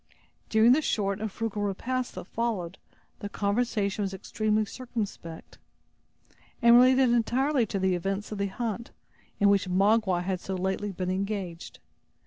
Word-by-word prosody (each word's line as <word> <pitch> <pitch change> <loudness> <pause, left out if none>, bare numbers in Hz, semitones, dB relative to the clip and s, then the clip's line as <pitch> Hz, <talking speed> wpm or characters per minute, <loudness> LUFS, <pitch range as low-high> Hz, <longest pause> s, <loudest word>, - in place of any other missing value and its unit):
During 220 +2 +5
the 290 +5 +4
short 200 -7 -1
and 220 -1 -3
frugal 220 -1 -3
repast 240 +6 -2
that - - -7
followed, 195 -5 -3 0.4
the 205 - -5
conversation 205 -1 -1
was 195 -1 -2
extremely 215 +2 0
circumspect, 210 -8 -7 1.0
and 235 -1 +6
related 255 0 +6
entirely 245 +2 +2
to 195 - -3
the 190 -1 +1
events 195 +4 -3
of 210 - -5
the 200 - 0
hunt, 230 +3 -4 0.5
in 205 - +4
which 200 -2 +3
Magua 195 -1 +2
had 185 0 -2
so 190 +2 -5
lately 190 +2 -2
been 185 -1 -3
engaged. 190 -3 -4
205 Hz, 145 wpm, -27 LUFS, 190-235 Hz, 1.0 s, and